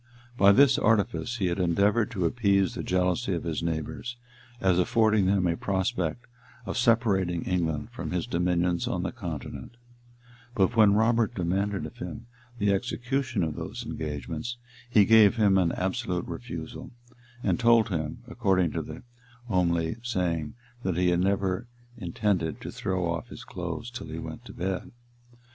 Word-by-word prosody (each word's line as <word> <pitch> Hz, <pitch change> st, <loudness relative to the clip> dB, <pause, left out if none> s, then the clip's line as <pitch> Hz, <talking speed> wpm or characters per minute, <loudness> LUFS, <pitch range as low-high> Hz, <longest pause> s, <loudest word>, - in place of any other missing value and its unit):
By 100 Hz, -4 st, +6 dB
this 135 Hz, +3 st, +5 dB
artifice, 110 Hz, 0 st, +1 dB
he 100 Hz, -, 0 dB
had 85 Hz, +1 st, 0 dB
endeavored 100 Hz, +5 st, +2 dB
to 95 Hz, -7 st, -2 dB
appease 100 Hz, -2 st, +2 dB
the -, -, -4 dB
jealousy 90 Hz, 0 st, 0 dB
of 85 Hz, -, -4 dB
his 80 Hz, -2 st, -2 dB
neighbors, 85 Hz, +8 st, -3 dB, 0.4 s
as 95 Hz, -2 st, +3 dB
affording 110 Hz, -1 st, +3 dB
them 95 Hz, -1 st, +2 dB
a 85 Hz, -1 st, +1 dB
prospect 95 Hz, +1 st, -1 dB, 0.4 s
of -, -, -4 dB
separating 100 Hz, -8 st, +2 dB
England 85 Hz, +2 st, -1 dB
from 125 Hz, -, -5 dB
his 90 Hz, -2 st, -1 dB
dominions 90 Hz, 0 st, 0 dB
on 90 Hz, -, -1 dB
the 95 Hz, -, -2 dB
continent; 90 Hz, -, -7 dB, 0.8 s
but 100 Hz, +4 st, +2 dB
when 105 Hz, -3 st, +6 dB
Robert 115 Hz, +1 st, +2 dB
demanded 95 Hz, 0 st, -1 dB
of 75 Hz, -, -10 dB
him 110 Hz, +6 st, -7 dB, 0.3 s
the 100 Hz, -2 st, +2 dB
execution 120 Hz, +1 st, -1 dB
of 80 Hz, -2 st, -2 dB
those -, -, -6 dB
engagements, 75 Hz, -, -4 dB, 0.3 s
he 105 Hz, -4 st, +5 dB
gave 110 Hz, -2 st, +6 dB
him 100 Hz, -4 st, +4 dB
an 85 Hz, -3 st, +2 dB
absolute 95 Hz, -1 st, -2 dB
refusal, 120 Hz, +1 st, -7 dB, 0.5 s
and -, -, +1 dB
told 115 Hz, -2 st, +5 dB
him, 80 Hz, -2 st, -3 dB
according 95 Hz, -8 st, +1 dB
to -, -, -2 dB
the -, -, -9 dB, 0.5 s
homely 85 Hz, -2 st, +1 dB
saying, 90 Hz, -10 st, -2 dB, 0.3 s
that 95 Hz, -6 st, -1 dB
he 90 Hz, -1 st, +3 dB
never 95 Hz, +4 st, 0 dB, 0.3 s
intended 90 Hz, -, -1 dB
to -, -, -6 dB
throw 95 Hz, -1 st, -2 dB
off 85 Hz, -1 st, -3 dB
his -, -, -10 dB
clothes -, -, -5 dB
till -, -, -7 dB
he -, -, -6 dB
went -, -, -7 dB
to -, -, -10 dB
bed. 95 Hz, +1 st, -3 dB
95 Hz, 155 wpm, -27 LUFS, 85-110 Hz, 0.8 s, By